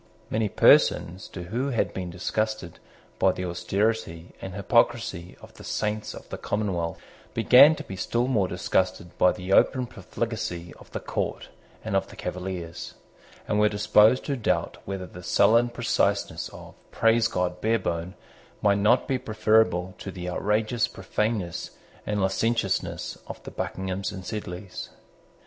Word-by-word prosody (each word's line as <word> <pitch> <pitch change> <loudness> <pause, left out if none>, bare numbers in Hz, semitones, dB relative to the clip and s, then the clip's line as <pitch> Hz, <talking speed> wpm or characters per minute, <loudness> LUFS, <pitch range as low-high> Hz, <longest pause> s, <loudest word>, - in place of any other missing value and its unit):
Many 110 -1 +1
persons 90 -1 +4
too 90 - -7
who 120 +10 -2
had 120 - 0
been 90 -2 -4
disgusted 110 +1 -3 0.4
by 95 - +4
the 90 - -4
austerity 90 0 -1
and 95 -1 -6
hypocrisy 100 -4 +1
of - - -14
the - - -13
Saints 105 0 -2
of - - -11
the - - -6
Commonwealth 95 -6 -2 0.4
began 125 +7 +8
to - - -7
be 95 - -7
still 120 +6 0
more 105 -8 +2
disgusted 90 -1 -1
by 90 - +6
the 90 +1 -3
open 130 +4 +4
profligacy 110 -8 -4
of - - -15
the - - -3
court - - -3 0.3
and - - -2
of - - +1
the - - -13
Cavaliers, 90 -2 -5 0.5
and 105 - +1
were 105 0 +5
disposed 105 +4 +4
to 140 - -1
doubt 120 - -1
whether 95 -1 -4
the 90 +1 -11
sullen 115 +7 +4
preciseness 115 -4 0
of - - -12 0.2
Praise 115 0 +3
God 90 -3 -2
Barebone 95 -5 -1 0.5
might 100 -1 +4
not 115 +5 +3
be 130 -2 0
preferable 110 -5 +2
to - - -6
the 90 -2 -6
outrageous 105 +5 +1
profaneness 95 -3 -3 0.3
and 105 -1 0
licentiousness 100 +1 0
of - - -8
the - - -8
Buckinghams 95 +2 -3
and 95 -2 -8
Sedleys. 95 -3 -6
100 Hz, 150 wpm, -26 LUFS, 90-110 Hz, 0.5 s, began